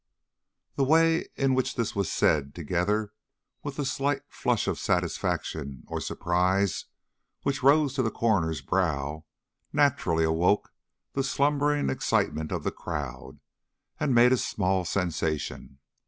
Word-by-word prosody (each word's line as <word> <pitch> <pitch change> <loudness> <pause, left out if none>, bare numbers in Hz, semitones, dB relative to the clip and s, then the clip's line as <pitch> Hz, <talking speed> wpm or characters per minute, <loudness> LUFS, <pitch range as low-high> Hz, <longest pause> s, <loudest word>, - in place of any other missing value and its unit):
The 140 - +3
way 165 +3 +3
in 135 -1 +2
which 130 0 0
this 115 -3 -2
was 100 -3 -1
said, 70 -2 +1
together 90 +6 -1 0.5
with 145 -1 -5
the 145 - -2
slight 140 +1 -1
flush - - 0
of - - -1
satisfaction 70 -4 -2
or - - -4
surprise 90 +2 0 0.6
which 140 -2 -1
rose 140 +1 +4
to 135 - 0
the 115 - +1
coroner's 85 - 0
brow, 75 -2 -1 0.5
naturally 140 - +2
awoke 80 +5 +2 0.4
the 135 - 0
slumbering 145 - +1
excitement 80 +3 0
of - - -2
the - - -1
crowd 65 -4 -6 0.6
and 130 - +1
made 120 +2 +6
a - - +3
small 95 -4 0
sensation. 80 -7 -2
100 Hz, 130 wpm, -27 LUFS, 80-135 Hz, 0.6 s, made